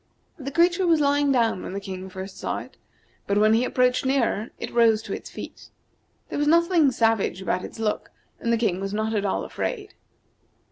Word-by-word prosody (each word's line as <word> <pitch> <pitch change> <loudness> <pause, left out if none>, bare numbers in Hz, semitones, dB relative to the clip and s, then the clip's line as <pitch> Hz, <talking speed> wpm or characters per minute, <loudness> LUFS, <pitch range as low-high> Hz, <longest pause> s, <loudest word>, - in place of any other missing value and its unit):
The 275 -1 -4
creature 345 +5 +3
was 330 -2 +4
lying 285 -1 +2
down 230 -7 +2
when - - -6
the 200 - -3
King 190 -1 -7
first 190 +1 -8
saw - - -2
it, - - -9 0.5
but 200 - +1
when 215 +1 +5
he 230 +2 +3
approached 250 0 +2
nearer 255 -5 0
it - - -6
rose 225 -2 +4
to - - -5
its - - -7
feet. - - -10 0.6
There - - -3
was 295 - +1
nothing 335 -2 +4
savage 225 -6 +1
about 185 -1 -1
its - - -8
look, 220 -1 -2 0.3
and 235 - -1
the 230 - +3
King 195 -5 0
was 195 +1 -3
not 220 +1 -1
at 205 -2 0
all 195 - -1
afraid. 410 -4 -4
230 Hz, 200 wpm, -24 LUFS, 200-285 Hz, 0.6 s, when